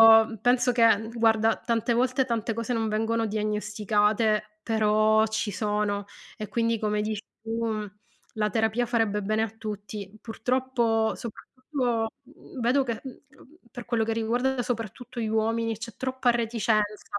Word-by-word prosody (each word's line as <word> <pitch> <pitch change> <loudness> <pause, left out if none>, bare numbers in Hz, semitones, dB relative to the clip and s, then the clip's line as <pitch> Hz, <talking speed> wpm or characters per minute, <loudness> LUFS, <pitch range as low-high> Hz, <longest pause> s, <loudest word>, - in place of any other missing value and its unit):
io 225 0 +7
penso 245 0 +3
che 225 -2 +4
guarda, 225 -1 +3
tante 235 0 0
volte, 255 +2 +2
tante 230 -2 -1
cose 230 +2 -2
non 225 -1 0
vengono 225 +1 0
diagnosticate, 210 0 0
però 215 0 +3
ci 220 0 -2
sono 205 0 -1 0.3
e 215 -2 -5
quindi 230 -1 +1
come 210 -1 0
dici 215 0 -3 0.2
tu, 225 +1 -2 0.7
la 210 -1 0
terapia 220 +3 +1
farebbe 225 -3 +1
bene 215 +2 +1
a 225 - -1
tutti. 210 -2 -7
Purtroppo 235 -2 0
soprattutto, 245 0 -3 0.2
mhmm, 265 0 -12
vedo 255 +4 +3
che, 235 -3 -3
mhmm, 265 -2 -9 0.5
per 245 - -7
quello 225 -2 +1
che 225 - -1
riguarda 245 +3 0
soprattutto 240 +1 -5
gli 225 - -1
uomini, 225 +1 0
c'è 230 0 -7
troppa 260 -1 -1
reticenza 215 -3 0
225 Hz, 145 wpm, -27 LUFS, 215-235 Hz, 0.7 s, io